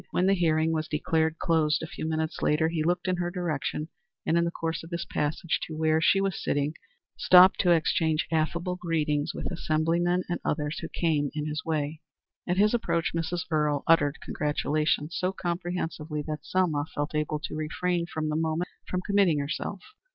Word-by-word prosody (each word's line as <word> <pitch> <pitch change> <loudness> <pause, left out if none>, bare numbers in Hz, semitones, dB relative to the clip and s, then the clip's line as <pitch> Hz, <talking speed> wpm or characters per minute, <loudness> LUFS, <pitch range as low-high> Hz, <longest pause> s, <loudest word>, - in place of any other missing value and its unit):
When 180 - +1
the 195 - +4
hearing 160 -3 +2
was 155 -1 -1
declared 160 +1 0
closed, 160 -2 +1
a - - -2
few 160 - -5
minutes 160 0 -2
later, 160 +2 +2
he 165 -1 -1
looked 175 +2 0
in 185 -1 +1
her 175 0 -1
direction, 155 -3 -3 0.4
and 165 - +2
in 170 0 +3
the - - 0
course 165 -1 -3
of 165 - -11
his 170 -1 -3
passage 150 +3 -1
to 155 - -7
where 160 0 +2
she 195 +3 +4
was 195 -1 -1
sitting 145 +1 0 0.5
stopped 185 +1 +7
to 180 - +3
exchange 160 -1 +2
affable 170 +3 0
greetings 155 -4 -1
with - - -4
assemblymen 170 +2 +1
and 175 - -2
others 150 0 -1
who - - -6
came 150 -4 0
in 150 -1 -2
his 150 0 -3
way. 155 -1 -2 0.5
At 180 0 0
his 210 +3 +4
approach 170 -8 0
Mrs. 165 +1 -2
Earle 150 -2 +1
uttered 150 -3 +4
congratulations 150 +1 0
so 185 +1 +1
comprehensive 175 -3 -3
that 150 0 -3
Selma 165 -6 0
felt 145 +1 -2
able 150 0 0
to 150 - -6
refrain 170 +3 -1
for 155 - -3
the 155 - -1
moment 160 +2 -1 0.2
from 180 - -1
committing 200 -6 +3
herself. 155 +7 -3
160 Hz, 185 wpm, -27 LUFS, 155-175 Hz, 0.5 s, stopped